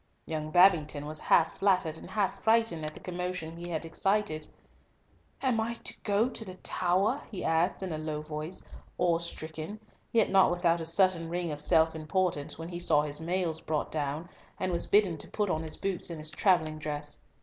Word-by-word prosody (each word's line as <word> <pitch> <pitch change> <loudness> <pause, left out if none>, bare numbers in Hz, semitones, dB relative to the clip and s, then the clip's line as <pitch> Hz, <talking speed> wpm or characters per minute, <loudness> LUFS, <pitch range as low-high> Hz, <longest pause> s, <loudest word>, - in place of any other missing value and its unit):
Young 155 -1 -3
Babington 155 -4 +4
was 155 +1 -3
half 165 -1 +3
flattered 185 -5 +2
and - - -8
half 205 -3 -1
frightened 225 -8 +3
at 155 0 -5
the - - -9
commotion 180 -2 -4
he 175 +1 -7
had 165 -1 -2
excited. 170 -2 0 1.0
"Am 255 -4 +2
I 230 +1 -1 0.2
going 220 +4 +1
to - - -5
the 185 -3 -8
Tower?" 190 +9 +1
he 195 -5 -5
asked, 165 +4 +1
in 185 -3 -3
a 155 - -3
low 155 -1 -3
voice, 155 +3 -6 0.4
awestricken, 165 +2 -2 0.3
yet 225 -2 +3
not 190 -1 +6
without 175 -1 +2
a 160 - -2
certain 170 -1 +2
ring 175 -1 -2
of 145 0 -5
self 160 +1 +4
importance, 160 -1 -1
when 165 +1 -6
he 175 -1 -5
saw 150 -4 +3
his 150 +1 -5
mails 170 -1 -1
brought 155 -1 -2
down, 150 +2 -2 0.3
and 185 -1 0
was 170 -1 +1
bidden 195 -6 +3
to - - -6
put 205 -3 0
on 155 - 0
his 160 -1 -1
boots 190 -3 -2
and 170 - -5
his 155 0 -4
travelling 160 -3 +2
dress. 150 -1 -5
170 Hz, 190 wpm, -30 LUFS, 155-185 Hz, 1.0 s, not